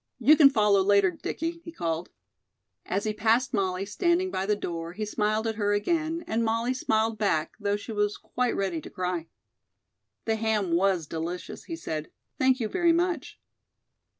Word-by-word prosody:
"You 305 Hz, -, +6 dB
can 295 Hz, -3 st, +8 dB
follow 210 Hz, -6 st, +3 dB
later, 200 Hz, -1 st, +4 dB
Dickie," 330 Hz, -, -4 dB
he 335 Hz, -, -8 dB
called. 165 Hz, -, -3 dB, 0.8 s
As 195 Hz, +2 st, -1 dB
he 215 Hz, -, -1 dB
passed 230 Hz, +5 st, +2 dB
Molly, 190 Hz, -2 st, 0 dB
standing 345 Hz, -, +1 dB
by 190 Hz, +1 st, -2 dB
the 210 Hz, -, +3 dB
door, 170 Hz, -4 st, -5 dB
he 215 Hz, +3 st, -3 dB
smiled 215 Hz, +1 st, 0 dB
at 220 Hz, -1 st, -2 dB
her 205 Hz, -1 st, +1 dB
again, 325 Hz, +9 st, 0 dB
and 225 Hz, +1 st, 0 dB
Molly 230 Hz, +2 st, 0 dB
smiled 220 Hz, -3 st, 0 dB
back, 165 Hz, -7 st, 0 dB
though 205 Hz, -1 st, 0 dB
she 205 Hz, -, -8 dB
was 210 Hz, -1 st, 0 dB
quite 250 Hz, -1 st, -2 dB
ready 185 Hz, -5 st, -1 dB
to -, -, -10 dB
cry. 180 Hz, -2 st, -3 dB, 1.0 s
"The 225 Hz, -1 st, +1 dB
ham 215 Hz, -4 st, 0 dB
was 180 Hz, -1 st, +2 dB
delicious," 165 Hz, +3 st, -5 dB
he 335 Hz, -, -5 dB
said. 155 Hz, -, -5 dB, 0.3 s
"Thank 260 Hz, 0 st, +3 dB
you 225 Hz, -, -1 dB
very 345 Hz, -, +2 dB
much." 340 Hz, -3 st, -1 dB
210 Hz, 175 wpm, -27 LUFS, 190-250 Hz, 1.0 s, can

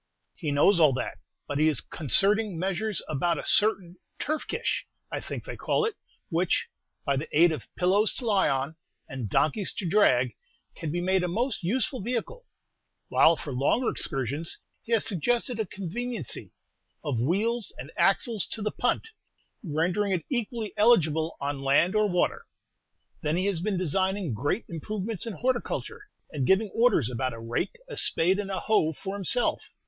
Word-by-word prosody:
"He 160 Hz, -, -4 dB
knows 145 Hz, +6 st, +4 dB
all 150 Hz, -4 st, +6 dB
that; 130 Hz, -, -4 dB, 0.3 s
but 145 Hz, 0 st, -2 dB
he 155 Hz, -, +4 dB
is 150 Hz, -, +2 dB
concerting 195 Hz, -, +1 dB
measures 195 Hz, +2 st, -1 dB
about 165 Hz, +3 st, 0 dB
a -, -, -5 dB
certain 195 Hz, -5 st, +3 dB, 0.2 s
turf 310 Hz, +1 st, -2 dB
kish, -, -, -2 dB, 0.2 s
I -, -, -2 dB
think -, -, -6 dB
they -, -, -6 dB
call 445 Hz, -, 0 dB
it, 450 Hz, -, -1 dB, 0.4 s
which, 170 Hz, +1 st, 0 dB, 0.4 s
by 140 Hz, -2 st, +1 dB
the 155 Hz, -, -4 dB
aid 170 Hz, 0 st, +7 dB
of 150 Hz, -7 st, -5 dB
pillows 195 Hz, +4 st, +2 dB
to 250 Hz, -, -5 dB
lie 200 Hz, -7 st, +3 dB
on, 135 Hz, +3 st, -2 dB, 0.3 s
and 130 Hz, -6 st, -5 dB
donkeys 185 Hz, -, +1 dB
to 185 Hz, -, -4 dB
drag, 125 Hz, -, +3 dB, 0.4 s
can 155 Hz, -, -4 dB
be 175 Hz, +2 st, -1 dB
made 190 Hz, +1 st, +2 dB
a -, -, +1 dB
most 235 Hz, +9 st, -1 dB
useful 250 Hz, -, -1 dB
vehicle; 250 Hz, -, -4 dB, 0.6 s
while, 165 Hz, -, +5 dB
for 145 Hz, -3 st, -6 dB
longer 140 Hz, -, +2 dB
excursions, 140 Hz, +3 st, -2 dB, 0.2 s
he 235 Hz, -, -11 dB
has 225 Hz, -, +3 dB
suggested 235 Hz, -, +1 dB
a 220 Hz, -, -1 dB
'conveniency' 200 Hz, -, -4 dB, 0.5 s
of 135 Hz, -6 st, -1 dB
wheels 210 Hz, -, 0 dB
and -, -, -8 dB
axles 230 Hz, -7 st, +3 dB
to 220 Hz, -, -3 dB
the 210 Hz, -, 0 dB
punt, 450 Hz, -, -1 dB, 0.5 s
rendering 175 Hz, +4 st, 0 dB
it 170 Hz, -4 st, -2 dB
equally 235 Hz, -3 st, -2 dB
eligible 165 Hz, -8 st, +3 dB
on 140 Hz, -1 st, -3 dB
land 140 Hz, +7 st, +3 dB
or 215 Hz, -1 st, +2 dB
water. 180 Hz, -1 st, 0 dB, 0.7 s
Then 155 Hz, +2 st, 0 dB
he 185 Hz, -, 0 dB
has 195 Hz, -5 st, 0 dB
been 200 Hz, 0 st, -1 dB
designing 185 Hz, -, 0 dB
great 145 Hz, -, -1 dB
improvements 210 Hz, +6 st, -4 dB
in 225 Hz, -, -3 dB
horticulture, 260 Hz, -, -2 dB, 0.2 s
and 140 Hz, -4 st, -2 dB
giving 195 Hz, +1 st, +3 dB
orders 225 Hz, -, +3 dB
about 125 Hz, +1 st, -2 dB
a 115 Hz, -, -8 dB
rake, 115 Hz, -, -2 dB
a -, -, -7 dB
spade, 185 Hz, +4 st, +2 dB
and 200 Hz, -1 st, -3 dB
a 190 Hz, -, -2 dB
hoe 165 Hz, -8 st, +2 dB
for 195 Hz, +6 st, -6 dB
himself. 205 Hz, +5 st, +2 dB
185 Hz, 170 wpm, -27 LUFS, 155-215 Hz, 0.7 s, aid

